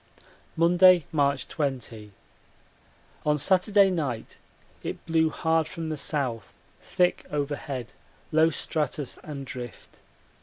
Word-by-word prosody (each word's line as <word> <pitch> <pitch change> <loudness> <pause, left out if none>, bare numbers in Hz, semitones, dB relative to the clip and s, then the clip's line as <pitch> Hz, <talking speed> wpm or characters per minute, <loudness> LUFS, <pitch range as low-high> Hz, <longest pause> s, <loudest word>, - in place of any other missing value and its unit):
Monday, 175 0 +6
March 140 -3 +1
20. 120 -7 -4 1.1
On 150 0 +2
Saturday 195 +5 +4
night 140 -10 -3 0.4
it - - -6
blew 160 -1 +2
hard 160 0 +1
from 165 -1 -5
the 155 - -2
south, 130 -8 -2 0.3
thick 180 0 +1
overhead, 140 -4 -3 0.4
low 160 +1 +5
stratus 150 -4 -3
and 140 -3 -7
drift. 125 -3 -9
150 Hz, 105 wpm, -26 LUFS, 135-165 Hz, 1.1 s, Monday